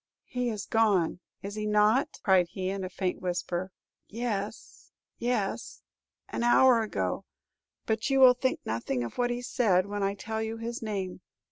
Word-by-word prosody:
He 250 -1 -2
is 210 -2 -4
gone, 205 -7 +2 0.2
is 200 +1 -5
he 215 0 -3
not?" 210 +7 +3
cried 185 -3 +4
he, 185 +1 -3
in 195 -1 -4
a 185 - -4
faint 185 0 -2
whisper. 180 0 -2 0.4
"Yes, 215 -2 -5 0.3
yes, 235 -5 -2 0.4
an - - -4
hour 240 0 +6
ago; 95 - -2 0.6
but 220 +3 0
you 270 0 +3
will 255 -1 +9
think 260 +1 -1
nothing 120 +3 -2
of 120 - -7
what 245 0 +2
he 245 0 -3
said, 200 -8 +2
when 205 0 -4
I 195 0 0
tell 220 +2 -4
you 220 +1 -3
his 235 +1 -5
name. 195 -5 -4
210 Hz, 165 wpm, -29 LUFS, 185-235 Hz, 0.6 s, will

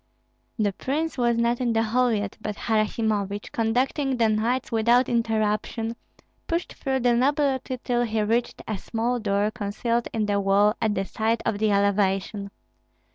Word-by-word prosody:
The 205 -3 +1
prince 300 +8 -2
was 240 -2 +1
not 235 +1 +1
in 240 -2 +1
the 225 0 +2
hall 245 +3 +2
yet; 205 -3 -2
but 210 -1 -4
Harasimovich, 215 -2 -1
conducting 255 +4 0
the 225 -2 +3
knights 230 +4 0
without 235 +3 +3
interruption, 225 0 0 0.5
pushed 335 +1 -2
through 265 -2 -2
the 245 0 +3
nobility 265 0 +1
till 240 -1 +1
he 220 -2 0
reached 230 +3 -1
a 215 -3 -3
small 235 +4 -1
door 205 -1 0
concealed 230 +2 -2
in 220 -2 0
the 205 -1 +1
wall 200 +1 +3
at 215 -2 +1
the 195 0 -1
side 225 +3 -1
of 215 -2 0
the 215 0 +2
elevation. 200 0 +1
225 Hz, 160 wpm, -25 LUFS, 210-245 Hz, 0.5 s, the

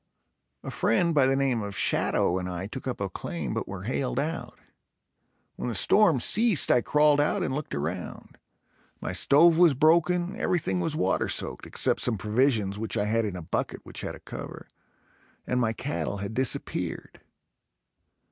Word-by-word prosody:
A - - -6
friend 170 +9 +1
by 140 -4 +4
the 135 - +2
name 135 -4 0
of 100 -2 -5
Shatto 90 +2 +1
and 90 0 -5
I 90 +1 -4
took 130 +6 -7
up 130 - -3
a 100 - -2
claim 80 -7 -5
but - - -3
were 95 -1 -7
hailed 130 +3 -2
out. 160 +4 -4 1.0
When - - -3
the 115 - -3
storm 170 - +4
ceased, 215 - +4
I 125 - +4
crawled 150 +1 +3
out 150 - 0
and - - -2
looked 150 +2 -4
around. 80 +5 -6 0.6
My - - -4
stove 165 +3 +4
was 170 -5 +5
broken, 170 +5 +2
everything 120 - 0
was 90 - -1
water - - 0
soaked, - - -3
except - - +1
some 115 -3 +1
provisions 105 -2 0
which 110 -1 -3
I 105 - 0
had 115 +1 +1
in 100 -3 -4
a 90 - -7
bucket - - -3
which - - -6
had - - -5
a - - -13
cover - - -9 0.8
and 125 - -1
my 115 -2 +1
cattle 120 -4 -3
had 100 +2 -5
disappeared. 130 +2 -3
125 Hz, 175 wpm, -26 LUFS, 100-150 Hz, 1.0 s, was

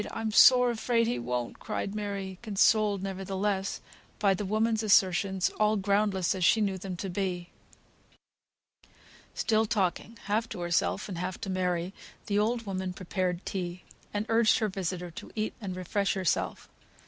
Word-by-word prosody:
I'm 225 -1 -3
sore 250 +2 +7
afraid 230 0 +1
he 235 - -1
won't," 120 0 -3
cried 200 - -3
Mary, 200 -3 -4
consoled, 210 -2 +2
nevertheless, 195 +1 -2 0.4
by 200 -2 +3
the 200 +2 -3
woman's 220 +2 +1
assertions, 190 -2 +3
all 215 0 +3
groundless 200 -2 +1
as 185 -2 -3
she 220 - +5
knew 195 -3 0
them 185 -1 -5
to 195 - -4
be. 180 -2 -3 1.8
Still 220 -1 +2
talking 205 +2 -1
half 215 +3 0
to - - -6
herself 175 +3 0
and 185 -4 -5
half 180 0 -4
to 195 - -3
Mary, 180 -1 -1 0.3
the 205 0 +1
old 230 +2 0
woman 190 -2 -3
prepared 185 -1 -2
tea, 180 -2 -4 0.3
and 205 +1 -2
urged 225 -1 +4
her 220 -3 0
visitor 180 -2 -4
to 165 - -10
eat 215 -1 -1
and 190 -3 -4
refresh 195 +3 -1
herself. 185 -4 -1
195 Hz, 155 wpm, -29 LUFS, 185-215 Hz, 1.8 s, sore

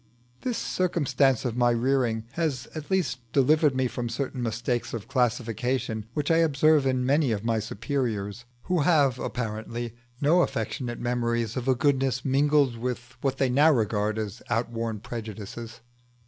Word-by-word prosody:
This 245 -3 -2
circumstance 140 -8 +1
of 120 -2 -1
my 120 -1 +3
rearing 120 -2 +1
has 140 -8 -2
at 155 -2 -7
least 170 -11 0
delivered 145 +1 +4
me 130 0 +1
from 120 -1 -3
certain 130 +2 -3
mistakes 120 +1 -2
of 110 -1 -6
classification 120 -3 -1
which 150 +1 0
I 165 - +5
observe 155 -2 +4
in 130 -1 +1
many 140 -1 +3
of 105 0 -2
my 115 -1 +1
superiors, 110 -1 -3 0.2
who 180 -1 0
have 140 -5 +3
apparently 115 0 -4 0.3
no 160 +5 +4
affectionate 125 -7 -2
memories 120 -2 -1
of 130 -1 -3
a 130 - +4
goodness 135 -2 +1
mingled 140 -2 +3
with 120 0 -4
what 135 -1 0
they 135 -2 +1
now 145 +5 +5
regard 110 -4 0
as 110 0 -4
outworn 115 -2 -2
prejudices. 115 0 -7
125 Hz, 150 wpm, -26 LUFS, 115-140 Hz, 0.3 s, I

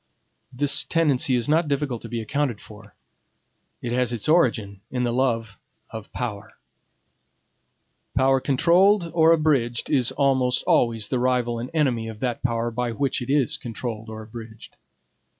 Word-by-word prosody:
This 140 +2 +2
tendency 145 -5 +1
is 120 -1 -1
not 160 +2 +2
difficult 140 -4 -2
to - - -9
be 115 -1 -3
accounted 135 -1 -2
for. 105 0 -14 0.9
It 120 - -3
has 125 -1 +1
its 115 -4 -3
origin 115 - +2
in 125 -1 -2
the 120 -1 0
love 115 -5 -1 0.3
of 110 -2 -8
power. 105 -5 -5 1.6
Power 135 0 +3
controlled 170 +7 +3
or 165 -1 +5
abridged 140 -8 +1
is 130 -5 +3
almost 130 -2 +1
always 115 -3 +1
the 130 - 0
rival 120 -2 0
and 120 +2 -5
enemy 130 -8 0
of 110 -1 -8
that 125 -3 -2
power 120 -1 -1
by 120 0 -2
which 135 +3 -1
it 125 - -6
is 145 +1 +2
controlled 115 -3 -6
or 110 0 -7
abridged. 110 0 -11
125 Hz, 150 wpm, -24 LUFS, 115-140 Hz, 1.6 s, or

